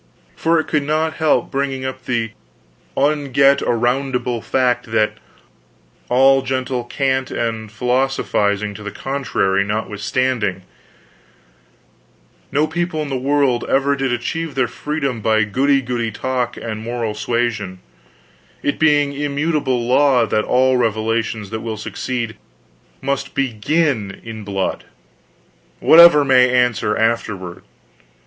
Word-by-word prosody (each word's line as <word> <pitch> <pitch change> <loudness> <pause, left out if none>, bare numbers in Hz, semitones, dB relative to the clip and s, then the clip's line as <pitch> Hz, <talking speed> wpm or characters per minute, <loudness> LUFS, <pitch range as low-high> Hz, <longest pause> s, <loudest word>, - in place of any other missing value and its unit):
For 165 0 +2
it 155 - -2
could 150 - 0
not 155 +2 -1
help 155 -2 +1
bringing 135 -1 -2
up 130 -1 -6
the 115 -3 -1 0.7
unget 140 -1 +3
aroundable 125 0 0
fact 125 -3 0
that, 110 -1 +1 0.9
all 135 +2 +5
gentle 130 -1 -2
cant 130 0 -1
and 115 -2 -3
philosophizing 110 -4 0
to 100 - -10
the 105 - -5
contrary 100 -7 -1
notwithstanding, 105 0 -1 1.9
no 150 +2 +2
people 160 0 -2
in 145 - -6
the 135 - -2
world 135 -2 +1
ever 140 +1 +2
did 135 -2 -1
achieve 140 +5 -3
their 130 -2 +1
freedom 140 -2 -3
by 110 0 +2
goody 135 +6 +1
goody 120 -2 -2
talk 125 +3 -2
and 110 -2 -5
moral 115 -1 -3
suasion: 105 -3 -2 0.9
it 145 - -1
being 145 -2 +3
immutable 145 -3 -1
law 130 -2 +4
that 110 -1 0
all 130 0 +3
revolutions 110 -2 -1
that 110 0 -4
will 110 -2 -4
succeed 115 +1 -4 0.7
must 140 0 -2
begin 130 -3 0
in 110 -2 -8
blood, 100 -2 -3 0.9
whatever 165 -3 +8
may 130 -2 +5
answer 120 -4 +1
afterward. 105 -6 -1
125 Hz, 120 wpm, -19 LUFS, 110-140 Hz, 1.9 s, whatever